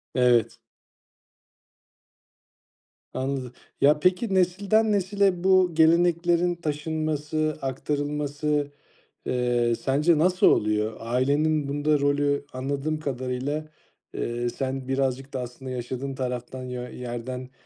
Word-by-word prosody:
Evet. 120 -2 +3 2.6
Anladım. 130 -2 -3 0.3
Ya, 150 +1 +5
peki, 185 +5 +1
nesilden 200 +4 +2
nesile 195 -2 +1
bu 185 -1 +5
geleneklerin 170 +2 +3
taşınması, 155 -1 -2
aktarılması, 145 +2 -2 0.6
eee, 120 -1 +1
sence 150 +6 +2
nasıl 180 +3 +3
oluyor? 105 +1 +2
Ailenin 140 +5 +1
bunda 145 +1 +1
rolü 145 0 +1
anladığım 140 +4 -2
kadarıyla, 135 +2 -3 0.5
eee, 120 +1 -2
sen 130 +1 -4
birazcık 135 0 -1
da 130 - -3
aslında 125 +2 -7
yaşadığın 130 +2 -4
taraftan 125 0 -4
yö 125 -1 -5
yerden 125 +1 -6
145 Hz, 95 wpm, -25 LUFS, 125-155 Hz, 2.6 s, Ya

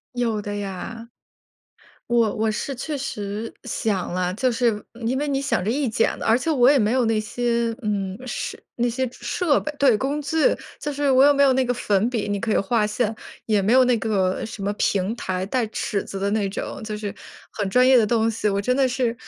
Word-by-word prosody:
有 230 -3 0
的 205 0 -5
呀。 205 +4 -6 1.0
我 235 -3 +2
我 220 0 0
是 270 +5 -3
确 290 +4 -4
实 215 -4 -4
想 190 -5 -2
了， 180 0 0
就 250 +6 +1
是 230 -3 0 0.2
因 260 +3 0
为 295 0 -1
你 275 0 0
想 270 -9 0
这 210 - -1
一 275 +2 0
剪 225 0 +1
子 - - -5
而 225 +2 +4
且 320 - -2
我 255 -3 +5
也 285 - +5
没 215 +1 +2
有 255 -2 +2
那 225 -1 +1
些， 235 +1 -1
嗯， 200 -2 -2
设 245 - -4 0.2
那 240 0 +1
些 260 +2 -1
设 355 -4 0
备， 305 - -4
对， 270 -5 +5
工 275 +6 -1
具， 295 +3 -3 0.4
就 295 - -3
是 285 -1 0
我 260 +1 +6
也 - - +7
没 280 - +3
有 270 -2 +5
那 260 0 +2
个 245 0 0
粉 210 -1 +1
笔， 230 -5 -2
你 205 -1 -2
可 225 - -2
以 - - +3
画 210 +1 +1
线， 215 +1 -1 0.3
也 210 -2 +2
没 215 +6 +2
有 260 -1 +7
那 250 -1 +3
个 190 -4 0
什 215 -2 -8
么 205 - 0
平 195 +3 +1
台， 185 -3 -3
带 235 +2 0
尺 215 -1 -2
子 195 - -7
的 200 +1 -1
那 205 -2 0
种， 195 - -5
就 215 -1 -4
是 210 -2 -5 0.4
很 205 -3 -2
专 250 +6 +4
业 260 -1 +7
的 215 - +3
东 225 0 +2
西。 215 -1 -1
我 200 0 0
真 250 +5 +1
的 265 -1 +3
是 245 -2 0
230 Hz, 245 characters per minute, -23 LUFS, 205-255 Hz, 1.0 s, 也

